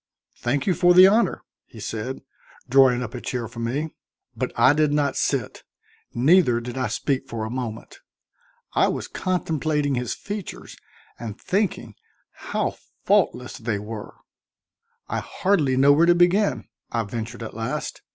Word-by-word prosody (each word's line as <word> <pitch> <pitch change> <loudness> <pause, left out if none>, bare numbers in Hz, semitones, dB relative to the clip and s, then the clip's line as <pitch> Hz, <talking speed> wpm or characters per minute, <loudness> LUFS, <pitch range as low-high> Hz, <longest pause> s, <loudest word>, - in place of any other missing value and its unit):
"Thank 130 +4 -1
you 185 - +3
for 175 +2 +4
the 185 +1 +10
honor," 215 +4 +3 0.2
he - - -13
said, 115 +5 -5 0.4
drawing 125 -1 +5
up 110 - -7
a 125 - -6
chair 125 -3 -3
for 115 +2 -10
me. 140 +7 -2 0.4
But - - -2
I 135 - +6
did 150 0 +2
not 145 -1 +1
sit, - - -1 0.5
neither 130 -1 +4
did 120 +1 -7
I 130 -1 -1
speak 135 -2 -2
for 110 -2 -3
a 110 - -5
moment. 120 -3 -6 0.7
I - - +4
was - - -3
contemplating 155 -5 -1
his 125 -6 -2
features 205 -2 -7 0.4
and 110 -1 -7
thinking 195 0 -1 0.4
how - - -3 0.3
faultless 125 +1 +1
they 110 -2 -2
were. 105 +1 -7 0.9
"I - - -2
hardly 155 -10 +1
know 140 +2 +6
where 165 +4 +4
to 175 - +6
begin," 180 +4 +2 0.2
I 115 -1 0
ventured 115 +2 -6
at 110 - -7
last. 115 0 -4
130 Hz, 150 wpm, -24 LUFS, 115-160 Hz, 0.9 s, the